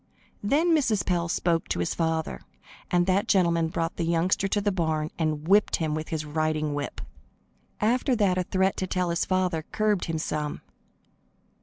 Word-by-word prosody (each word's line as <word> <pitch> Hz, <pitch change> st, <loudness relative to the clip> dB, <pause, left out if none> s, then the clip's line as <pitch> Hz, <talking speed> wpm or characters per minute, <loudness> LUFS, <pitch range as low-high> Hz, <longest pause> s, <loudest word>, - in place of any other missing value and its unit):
Then 315 Hz, +10 st, +3 dB
Mrs. 235 Hz, -9 st, +1 dB
Pell 170 Hz, -2 st, 0 dB
spoke 170 Hz, -1 st, 0 dB
to -, -, -2 dB
his 85 Hz, -1 st, -1 dB
father, 160 Hz, -1 st, -1 dB, 0.5 s
and 175 Hz, 0 st, +3 dB
that 195 Hz, +4 st, +1 dB
gentleman 170 Hz, -4 st, +3 dB
brought 165 Hz, +1 st, -3 dB
the -, -, -1 dB
youngster 170 Hz, +4 st, +1 dB
to 205 Hz, -, 0 dB
the 205 Hz, 0 st, 0 dB
barn 160 Hz, -4 st, -1 dB
and 155 Hz, -1 st, -1 dB
whipped 205 Hz, +3 st, +4 dB
him 160 Hz, -2 st, -1 dB
with 155 Hz, 0 st, -4 dB
his 155 Hz, -1 st, -3 dB
riding 155 Hz, 0 st, -1 dB
whip. 145 Hz, 0 st, -4 dB, 0.8 s
After 245 Hz, +4 st, +2 dB
that 200 Hz, -5 st, +2 dB
a 185 Hz, -, +1 dB
threat 190 Hz, +2 st, +1 dB
to 185 Hz, -, -2 dB
tell 180 Hz, -1 st, 0 dB
his 170 Hz, -, 0 dB
father 185 Hz, -3 st, 0 dB
curbed 210 Hz, -3 st, +1 dB
him 165 Hz, -1 st, -2 dB
some. 150 Hz, -1 st, -3 dB
170 Hz, 175 wpm, -26 LUFS, 160-195 Hz, 0.8 s, whipped